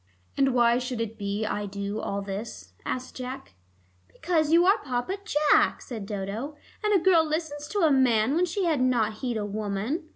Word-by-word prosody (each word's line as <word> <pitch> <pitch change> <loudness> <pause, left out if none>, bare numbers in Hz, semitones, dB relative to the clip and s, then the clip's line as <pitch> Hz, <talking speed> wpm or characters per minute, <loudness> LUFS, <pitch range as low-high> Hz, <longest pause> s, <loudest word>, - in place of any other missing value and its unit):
"And 270 -2 +2
why 240 0 +4
should 250 -1 -4
it 225 -1 -3
be 205 0 -2
I 205 -1 -2
to 200 +1 -8
do 200 +2 -3
all 200 -1 -3
this?" 195 - -7
asked 255 0 -4
Jack. 260 +1 -7 0.6
"Because 320 -3 0
you 340 +2 +6
are 395 +3 +5
Papa 255 +8 -2
Jack," 300 -7 +3
said 220 -6 -7
Dodo, 210 +8 -4 0.3
"and 420 - +2
a 405 - +6
girl 350 -2 +5
listens 305 -2 -3
to 410 +4 -1
a 320 -3 +4
man 255 -2 +3
when 345 +3 +3
she 370 +2 -1
would 310 -6 +1
not 225 -4 +1
heed 245 -3 -2
a 210 - -2
woman. 215 - -3
250 Hz, 195 wpm, -27 LUFS, 215-310 Hz, 0.6 s, you